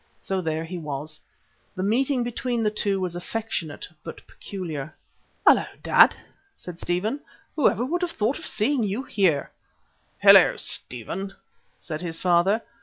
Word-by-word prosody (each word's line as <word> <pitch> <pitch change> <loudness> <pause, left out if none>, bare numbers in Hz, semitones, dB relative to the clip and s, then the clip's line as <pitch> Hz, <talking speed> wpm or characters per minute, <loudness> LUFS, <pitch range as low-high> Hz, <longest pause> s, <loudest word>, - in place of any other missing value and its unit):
So 190 -1 -2
there 160 -1 -2
he 175 +2 -6
was. 155 0 -5 0.6
The 185 - -3
meeting 250 +5 +1
between 240 0 -2
the 210 - +2
two 200 -2 0
was 180 -2 -3
affectionate 175 -4 -4 0.2
but - - -9
peculiar. 155 -7 -6 0.5
"Hullo, - - +6 0.2
dad!" - - +6 0.4
said 175 -1 -10
Stephen. 205 +10 -1 0.4
"Whoever 250 -4 +2
would 345 +7 -1
have 355 - 0
thought 240 -2 -1
of 320 - -6
seeing 240 +5 +2
you 210 +4 -1
here?" 175 - +1 0.7
"Hullo, - - +8
Stephen," 185 - -3 0.4
said 155 -2 -6
his 165 -2 -4
father. 185 +5 +3
195 Hz, 140 wpm, -25 LUFS, 165-230 Hz, 0.7 s, Hullo